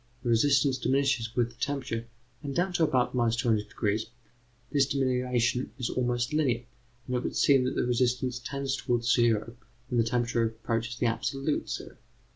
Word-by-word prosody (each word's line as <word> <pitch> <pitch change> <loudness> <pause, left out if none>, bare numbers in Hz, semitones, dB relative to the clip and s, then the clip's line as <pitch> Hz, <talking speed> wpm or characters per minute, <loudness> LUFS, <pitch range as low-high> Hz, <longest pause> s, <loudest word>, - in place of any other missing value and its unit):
The 120 - -1
resistance 135 +3 +3
diminishes 130 -4 +1
with 120 -1 +1
the - - -23
temperature, 130 -5 -2 0.3
and, 140 -3 -5
down 180 +1 +1
to 170 - +2
about 130 -5 +2
200°, 110 -3 0 0.7
this 140 -3 +3
diminution 125 -2 0
is 125 -3 -2
almost 120 +1 -1
linear, 130 -6 +1 0.4
and 125 - -2
it 125 - -3
would - - -3
seem 135 -3 +4
that 130 - -1
the - - +1
resistance 125 0 0
tends 135 +2 -3
towards 120 -2 +1
zero 115 -1 +2 0.3
when 120 - +1
the - - +5
temperature 120 0 0
approaches 115 +2 -2
the 125 - 0
absolute 135 +5 -1
zero. - - -6
125 Hz, 160 wpm, -28 LUFS, 115-135 Hz, 0.7 s, the